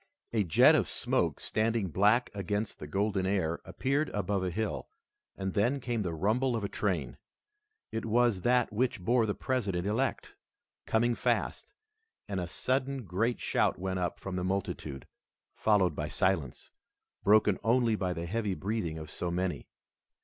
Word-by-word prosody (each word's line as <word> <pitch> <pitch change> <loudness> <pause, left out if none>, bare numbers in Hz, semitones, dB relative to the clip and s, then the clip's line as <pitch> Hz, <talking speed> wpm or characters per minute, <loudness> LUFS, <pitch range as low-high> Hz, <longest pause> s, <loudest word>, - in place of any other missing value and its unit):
A 110 -3 +3
jet 85 -5 +6
of - - +2
smoke - - 0
standing 110 -2 0
black 105 +8 +3
against 105 +2 -3
the 75 - -7
golden 95 +3 0
air 90 -4 0
appeared 140 +3 0
above 100 -1 0
a 90 - 0
hill, 90 - -3 0.5
and 95 -1 -3
then 120 +7 +2
came 120 -3 -2
the 85 -4 -2
rumble 115 +9 +1
of 110 - -2
a - - 0
train. 85 - -2 0.7
It 110 - -3
was 115 -3 +2
that 125 0 +2
which 120 +1 0
bore 115 +4 +2
the 105 - -1
President 100 -9 -1
elect, 115 +7 -1 0.6
coming 120 +2 +2
fast, - - -1 0.5
and 100 -2 -2
a 90 - -3
sudden 130 +5 -1
great 110 +7 0
shout - - +1
went 95 0 -2
up 90 -1 -2
from 95 -1 -5
the 90 - -1
multitude, 95 -7 -3 0.5
followed 100 -4 +2
by 75 - -2
silence, 85 -6 -1 0.5
broken 105 -2 +4
only 115 0 +3
by 95 -3 -1
the 85 -1 -3
heavy 105 +1 -1
breathing 95 -6 -2
of 80 -1 -8
so 90 - -3
many. 90 +1 -2
100 Hz, 160 wpm, -30 LUFS, 90-115 Hz, 0.7 s, jet